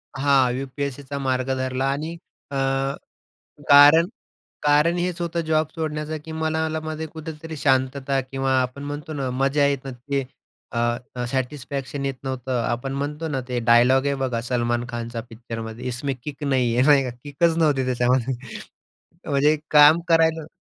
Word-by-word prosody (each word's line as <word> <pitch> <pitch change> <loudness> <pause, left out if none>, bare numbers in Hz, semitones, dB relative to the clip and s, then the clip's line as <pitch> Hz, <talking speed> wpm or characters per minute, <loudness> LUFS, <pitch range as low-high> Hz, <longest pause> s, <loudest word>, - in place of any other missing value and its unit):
हां, 135 -2 +3
यू-पी-एस-सीचा 140 +1 -5
मार्ग 130 -1 -1
धरला 130 0 -1
आणि 155 +4 -3 0.4
अ, - - -4 1.2
कारण 145 +4 +8 0.6
कारण 150 +4 +3
हेच 175 0 -2
होतं 170 0 -1
जॉब 155 0 +2
सोडण्याचं, 155 -1 -3
की 160 - -8
मनाला 160 0 -1
मध्ये 155 0 -5
कुठेतरी 160 0 -8
शांतता 135 0 +1
किंवा 135 +1 -2
आपण 130 +2 -3
म्हणतो 145 +2 -6
ना 140 -3 -2
मजा 135 +3 +2
येत 140 -2 -1
नव्हती, 135 +1 -3 0.5
अ, 120 +1 -2
सॅटिस्फॅक्शन 135 +1 -3
येत 135 - -2
नव्हतं. 130 -2 -2
आपण 120 +3 -2
म्हणतो 145 +3 -3
ना, 135 -3 -2
ते 125 - -1
डायलॉग 125 +3 +5
हे 140 - +1
बघा 120 -3 -1
सलमान 120 -1 0
खानचा 120 -1 -5
पिक्चरमध्ये 115 0 -7
इसमें 130 +3 -2
किक 150 0 -7
नाही 130 -4 +1
है, 125 - +3
नाही 145 -2 +6
का? 125 - -3
किकच 160 +3 +1
नव्हती 145 -5 +2
त्याच्यामध्ये 125 +1 +1 1.0
म्हणजे 145 +2 +3
काम 150 +2 +7
करायलो 160 -1 +3
140 Hz, 145 wpm, -23 LUFS, 130-150 Hz, 1.2 s, कारण